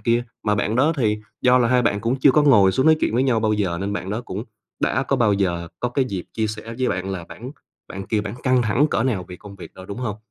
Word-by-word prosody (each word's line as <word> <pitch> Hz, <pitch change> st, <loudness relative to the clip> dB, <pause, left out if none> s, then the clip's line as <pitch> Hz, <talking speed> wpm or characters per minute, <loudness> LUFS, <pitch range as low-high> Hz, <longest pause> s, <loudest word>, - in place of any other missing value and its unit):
kia, 120 Hz, 0 st, +1 dB, 0.2 s
mà 105 Hz, -1 st, +2 dB
bạn 105 Hz, +2 st, -1 dB
đó 150 Hz, +5 st, +3 dB
thì 105 Hz, -4 st, +1 dB, 0.2 s
do 125 Hz, 0 st, +5 dB
là 120 Hz, -1 st, +2 dB
hai 125 Hz, 0 st, +3 dB
bạn 100 Hz, -3 st, 0 dB
cũng 115 Hz, +4 st, 0 dB
chưa 140 Hz, -, +6 dB
có 150 Hz, -, +4 dB
ngồi 105 Hz, -10 st, +5 dB
xuống 130 Hz, +9 st, +1 dB
nói 160 Hz, 0 st, +6 dB
chuyện 110 Hz, -, 0 dB
với 125 Hz, -, +2 dB
nhau 120 Hz, -4 st, +1 dB
bao 110 Hz, -1 st, +1 dB
giờ, 90 Hz, -5 st, -1 dB
nên 100 Hz, +1 st, -2 dB
bạn 95 Hz, -1 st, -4 dB
đó 110 Hz, +3 st, -2 dB
cũng 105 Hz, -2 st, -6 dB, 0.4 s
đã 130 Hz, -, +1 dB
có 135 Hz, -, 0 dB
bao 115 Hz, -4 st, +3 dB
giờ 85 Hz, -4 st, -1 dB
có 125 Hz, -, 0 dB
cái 130 Hz, +1 st, +1 dB
dịp 95 Hz, -6 st, -5 dB
chia 110 Hz, -1 st, 0 dB
sẻ 110 Hz, +2 st, -7 dB
với 130 Hz, -, +1 dB
bạn 95 Hz, +1 st, -3 dB
là 90 Hz, -3 st, -5 dB
bản 125 Hz, +3 st, -9 dB, 0.4 s
bản 95 Hz, 0 st, -7 dB
kia 110 Hz, -2 st, 0 dB
bản 105 Hz, +1 st, -6 dB
căng 130 Hz, -2 st, +3 dB
thẳng 120 Hz, +7 st, +2 dB
cỡ 115 Hz, -, 0 dB
nào 110 Hz, -9 st, -1 dB
về 90 Hz, -, -8 dB
công 100 Hz, 0 st, -12 dB
việc 90 Hz, -, -11 dB
đâu, 95 Hz, -, -11 dB
đúng 100 Hz, -, -7 dB
hông? 110 Hz, -5 st, -3 dB
110 Hz, 290 wpm, -22 LUFS, 100-125 Hz, 0.4 s, chưa